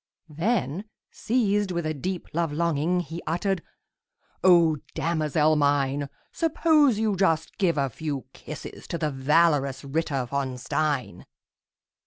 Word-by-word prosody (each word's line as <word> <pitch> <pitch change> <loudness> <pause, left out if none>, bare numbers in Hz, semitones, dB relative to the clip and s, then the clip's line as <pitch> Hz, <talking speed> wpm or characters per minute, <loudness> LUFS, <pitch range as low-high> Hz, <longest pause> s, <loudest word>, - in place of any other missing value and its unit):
Then, 175 - -1 0.3
seized 210 -4 +1
with 170 -2 -2
a 155 - -1
deep 180 +5 -4
love 165 -1 0
longing, 170 +2 +1
He 165 +1 -7
uttered, 175 +3 0 0.8
"O 170 -4 +6 0.2
damosel 155 -2 +1
mine, 140 -1 +1 0.2
Suppose 310 -6 +3
you 215 -2 +1
just 165 -4 +1
give 175 -6 +2
a 140 -1 +2
few 140 +1 -4
kisses 155 - -9
To 170 - -3
the 155 -2 -1
valorous 140 0 +2
Ritter 140 -2 -1
von 130 0 -3
Stein!" 135 - -2
160 Hz, 125 wpm, -26 LUFS, 145-180 Hz, 0.8 s, O